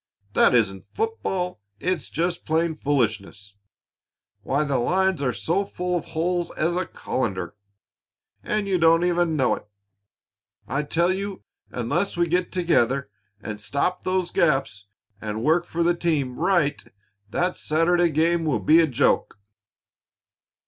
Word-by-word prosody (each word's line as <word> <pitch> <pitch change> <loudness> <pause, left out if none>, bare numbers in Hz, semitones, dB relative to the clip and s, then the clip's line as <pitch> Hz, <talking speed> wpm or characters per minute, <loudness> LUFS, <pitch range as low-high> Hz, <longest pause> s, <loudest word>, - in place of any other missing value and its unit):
That - - +5
isn't 95 -5 +1
football; 190 - -2 0.2
it's 180 -4 -2
just 170 +2 -2
plain 160 0 0
foolishness! 105 -8 -2 0.9
Why, 140 +3 0
the 140 -3 0
lines 185 +5 +1
are 135 - +1
as - - -5
full 180 0 -1
of 170 -1 -2
holes 175 +2 -1
as 170 +2 +1
a 180 -1 -1
colander 95 -9 -3 0.9
and 210 -1 -1
you 190 -2 +1
don't 165 +1 +5
even 175 -2 +1
know 130 -4 +2
it! - - -6 1.0
I 140 - -1
tell 170 +5 +1
you, 195 0 -5 0.3
unless 145 - -1
we 175 - +3
get 180 +2 0
together 140 - +1 0.3
and 105 -1 -6
stop 140 - -1
those 185 -1 -1
gaps 135 - +1 0.3
and 110 +1 -4
work 165 +4 +3
for 170 0 -1
the 175 +1 +3
team 150 -7 -1
right, 170 -5 +1 0.5
that 175 +10 +1
game - - -20
Saturday 165 0 +2
will 160 -3 0
be 160 +2 +5
a 165 - +4
joke." 130 -5 +1
165 Hz, 140 wpm, -24 LUFS, 135-175 Hz, 1.0 s, That